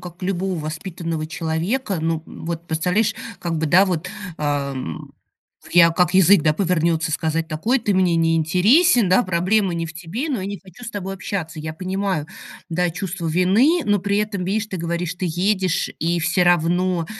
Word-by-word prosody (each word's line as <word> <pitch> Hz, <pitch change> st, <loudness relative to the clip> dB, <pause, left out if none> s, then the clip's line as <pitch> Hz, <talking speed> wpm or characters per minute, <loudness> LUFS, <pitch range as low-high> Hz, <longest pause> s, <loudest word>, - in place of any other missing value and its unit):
как 175 Hz, +1 st, -11 dB
любого 190 Hz, 0 st, -1 dB
воспитанного 160 Hz, 0 st, -4 dB
человека, 170 Hz, +7 st, -2 dB
ну, 160 Hz, 0 st, -1 dB
вот 170 Hz, 0 st, -6 dB
представляешь, 180 Hz, +7 st, +1 dB, 0.2 s
как 170 Hz, -3 st, -2 dB
бы, 160 Hz, -, 0 dB
да, 180 Hz, +6 st, +5 dB
вот, 180 Hz, -2 st, -2 dB, 0.3 s
а, 145 Hz, -2 st, -1 dB
м, 130 Hz, -, -6 dB, 0.5 s
в -, -, -17 dB
я 170 Hz, -1 st, +7 dB
как 180 Hz, +2 st, +1 dB
язык, 190 Hz, -1 st, +6 dB
да, 155 Hz, -, +3 dB
повернется, 165 Hz, -1 st, 0 dB
сказать 160 Hz, +1 st, -1 dB
такой: 215 Hz, +12 st, 0 dB
"Ты 210 Hz, -, 0 dB
мне 185 Hz, -2 st, +3 dB
не 165 Hz, 0 st, +2 dB
интересен, 210 Hz, -, +4 dB
да, 185 Hz, +7 st, +4 dB
проблема 185 Hz, +2 st, +1 dB
не 165 Hz, 0 st, -2 dB
в 165 Hz, -, -10 dB
тебе, 185 Hz, -, -4 dB
но 260 Hz, -8 st, -1 dB
я 185 Hz, -, -4 dB
не 200 Hz, 0 st, -5 dB
хочу 190 Hz, +6 st, -14 dB
с 230 Hz, -, -6 dB
тобой 195 Hz, -3 st, -5 dB
общаться". 180 Hz, -4 st, -5 dB
Я 155 Hz, 0 st, -5 dB
понимаю, 185 Hz, -2 st, -2 dB, 0.4 s
да, 175 Hz, +1 st, 0 dB
чувство 180 Hz, 0 st, -5 dB
вины, 195 Hz, -, +3 dB
но 205 Hz, -1 st, +2 dB
при 200 Hz, +2 st, 0 dB
этом, 210 Hz, -3 st, -2 dB
видишь, 205 Hz, +4 st, -1 dB
ты 195 Hz, -, -5 dB
говоришь, 170 Hz, +1 st, -3 dB
ты 185 Hz, 0 st, -3 dB
едешь, 185 Hz, +2 st, 0 dB
и 170 Hz, +1 st, 0 dB
всё 175 Hz, +2 st, +2 dB
равно 175 Hz, 0 st, +2 dB
180 Hz, 185 wpm, -21 LUFS, 165-195 Hz, 0.5 s, я